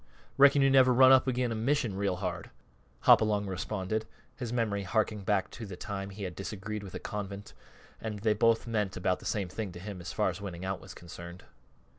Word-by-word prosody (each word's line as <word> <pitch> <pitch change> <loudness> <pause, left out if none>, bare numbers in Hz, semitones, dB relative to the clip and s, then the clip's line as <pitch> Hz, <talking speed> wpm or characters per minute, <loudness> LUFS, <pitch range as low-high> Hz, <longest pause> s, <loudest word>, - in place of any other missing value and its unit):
"Reckon 140 0 +6
you 135 - +4
never 130 -1 +6
run 130 +1 +7
up 130 0 +6
agin' 125 -1 0
a - - -1
mission 115 -2 0
real 100 -1 0
hard," 90 -2 -4 0.5
Hopalong 105 -2 +5
responded, 95 +4 -3 0.3
his 120 -3 -5
memory 110 -4 0
harking 105 +2 0
back 100 -1 0
to 115 - -7
the 95 - -7
time 95 +1 -5
he 100 +1 -8
had 90 -3 -5
disagreed 105 +2 -5
with 95 -3 -9
a - - -4
convent, 100 -1 -6 0.5
and 110 -2 -4
they 105 +1 +2
both 115 +2 +3
meant 105 -4 -1
about 90 0 0
the - - -13
same 100 -4 -1
to 95 -2 -5
him 95 -1 -7
as 85 -3 -6
far - - +1
as - - -9
winning 95 -2 -6
out 95 0 -3
was - - -11
concerned. 85 +1 -10
105 Hz, 205 wpm, -30 LUFS, 95-115 Hz, 0.5 s, run